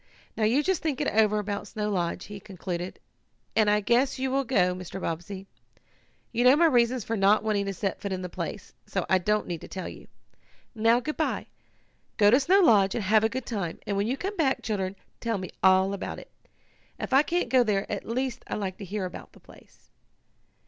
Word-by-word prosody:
Now 220 - +1
you 255 +7 +3
just 380 0 0
think 305 -5 -1
it 295 - 0
over 215 -1 +3
about 205 0 -3
Snow 210 0 -3
Lodge," 180 -1 -2
he 205 0 -8
concluded, 180 -2 -6 0.6
"and 215 -1 +4
I 210 0 +3
guess 245 +7 +2
you 260 0 -1
will 275 +1 +1
go, 180 -8 +2
Mr. 185 +1 -7
Bobbsey. 185 +3 -5 0.9
You 240 +1 +1
know 255 +2 +7
my 335 +3 +4
reasons 245 -4 +3
for 225 - -2
not 205 +1 +4
wanting 205 -2 0
to 195 - -2
set 195 +1 -3
foot 200 - -4
in 185 -1 -3
the - - -3
place, - - -6
so - - -2
I 190 - +5
don't 210 +4 +1
need 170 -3 -5
to - - -9
tell 185 - -6
you. - - -10 0.7
"Now, 230 +1 +3
good 305 +4 -4
bye. 315 - -1 0.7
Go 205 -2 +6
to 250 - +6
Snow 375 +8 +4
Lodge, 205 - +5
and 230 - -1
have 215 +3 +4
a 220 - +3
good 260 +1 -4
time, 195 -8 -3
and 205 -2 -2
when 200 +2 0
you 260 +3 -1
come 390 +6 -4
back, 280 -7 +1
children, 195 -3 -2 0.2
tell 230 -2 -1
me 185 -1 -6
all 190 +1 +4
about 200 - -5
it. - - -12 0.7
If - - -4
I 270 - +7
can't 345 +3 -1
go 255 -2 +5
there 205 -3 0
at 205 - -4
least 255 +2 -3
I - - -3
like 190 -3 -4
to 200 - -6
hear 195 +1 -3
about 180 - -9
the - - -17
place." - - -20
210 Hz, 220 wpm, -27 LUFS, 195-250 Hz, 0.9 s, know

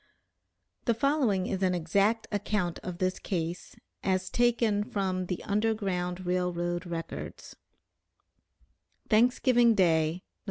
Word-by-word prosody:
The 235 - +2
following 245 -8 +1
is 190 -1 -2
an 185 -1 +2
exact 200 +7 +1
account 205 -4 -1
of 180 -2 -6
this 185 0 -1
case, 170 -1 -4 0.3
as 185 -1 0
taken 235 -4 +2
from 190 -5 -2
the 180 - -4
Underground 195 -4 -1
Rail 180 0 +1
Road 175 +1 -3
records: 165 -1 -6 1.6
"THANKSGIVING 240 +1 +4
DAY, 160 -5 +3
Nov. 180 - -10
185 Hz, 115 wpm, -29 LUFS, 180-215 Hz, 1.6 s, THANKSGIVING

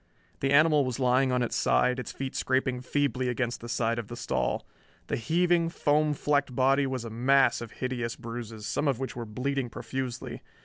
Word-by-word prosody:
The 135 - 0
animal 150 0 +5
was 130 -1 -3
lying 130 +1 +3
on 125 -1 +2
its 120 - -2
side, 125 - +2
its 125 - -5
feet 135 -1 -5
scraping 130 -1 0
feebly 130 -1 0
against 120 0 -2
the 120 - -8
side 115 0 0
of 110 - -6
the 120 - -7
stall. - - -1 0.4
The - - -2
heaving, 170 +6 +2
foam 150 -2 +1
flecked 140 -3 0
body 135 +2 +3
was 130 -3 -3
a 115 - -6
mass 125 +2 +3
of 115 - -8
hideous 120 -3 -3
bruises, 115 -2 -7
some 115 +7 -1
of 135 -4 +2
which 130 -1 -4
were 120 -1 -5
bleeding 130 +3 -2
profusely. 130 0 -5
130 Hz, 190 wpm, -28 LUFS, 120-140 Hz, 0.4 s, animal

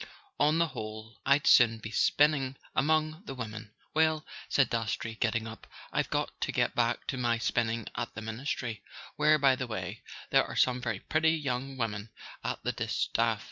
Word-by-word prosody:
On 150 +2 +4
the 170 -1 +2
whole 110 -1 -8
I'd 140 +1 +4
sooner 115 -2 +6
be 110 0 -8
spinning 140 +1 +3 0.2
among 155 +2 +1
the 135 - -6
women." 110 -3 -6 0.2
"Well," 155 0 +2 0.2
said 135 - +4
Dastrey, 115 0 -2
getting 110 0 0
up, 110 0 -9 0.3
"I've - - 0
got - - -2
to - - 0
get - - +1
back - - 0
to 130 - -2
my 120 -2 +1
spinning 115 -1 0
at 120 0 -4
the 115 - -5
Ministry; 115 -1 -3 0.3
where, 150 +1 +5
by 135 -2 +4
the 130 -1 -4
way, 100 -1 -5 0.3
there - - +5
are - - -7
some 125 -1 +3
very 115 -5 -2
pretty 160 +1 +2
young 135 -3 -3
women 110 -3 -3 0.3
at - - -3
the - - 0
distaff. - - 0
125 Hz, 180 wpm, -30 LUFS, 110-145 Hz, 0.3 s, sooner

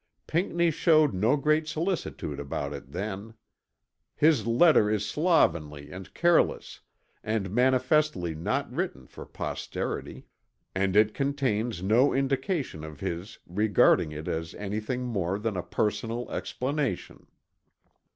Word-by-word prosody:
Pinckney 170 0 +1
showed 155 - +4
no 110 +10 +2
great 155 +2 +1
solicitude 155 - -3
about 70 0 -4
it 70 -1 -9
then. 100 +5 -5 0.8
His 145 -8 +3
letter 115 -2 +5
is 105 -1 0
slovenly 85 - +1
and 95 0 -9
careless 170 0 +2 0.4
and 110 -4 -2
manifestly 130 - +2
not 80 +2 -1
written - - -3
for - - -11
posterity, - - -5 0.5
and 95 0 0
it 105 0 +5
contains 125 -8 -1
no 115 +8 +3
indication 135 - -1
of 75 -2 -9
his 95 +3 -5
regarding 100 -4 +3
it 75 +1 -7
as 80 0 -3
any 105 +1 -3
thing 125 +4 -3
more 100 -6 -1
than 105 -1 -2
a 90 - -1
personal 105 +6 -2
explanation. 135 -6 -3
110 Hz, 120 wpm, -27 LUFS, 95-140 Hz, 0.8 s, letter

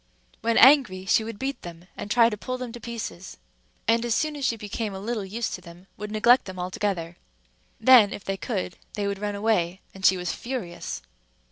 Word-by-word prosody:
When 230 0 +1
angry, 250 -10 +6
she 220 - +3
would 225 -1 -6
beat 270 +3 -3
them, 170 0 -10
and - - -7
try 235 +1 +5
to - - -2
pull 255 +5 -4
them 250 -2 -6
to 240 - -9
pieces, 220 -6 -7 0.5
and 230 +1 +3
as 235 -2 0
soon 305 -1 0
as 285 - -6
she 230 -3 +1
became 210 0 -4
a - - -5
little 215 +1 -3
used 220 +4 -3
to 180 - -6
them, 175 +1 -14
would 210 0 -6
neglect 240 +4 +4
them 190 -1 -8
altogether. 180 -2 -3 0.6
Then, 230 -4 +7
if 200 - -7
they 195 - -2
could, 190 -3 -4 0.2
they 205 - -2
would 200 -1 -2
run 205 0 -3
away, 195 -4 0
and 190 - -12
she 190 0 +5
was 180 -1 -2
furious. 235 -9 -5
210 Hz, 210 wpm, -25 LUFS, 190-235 Hz, 0.6 s, Then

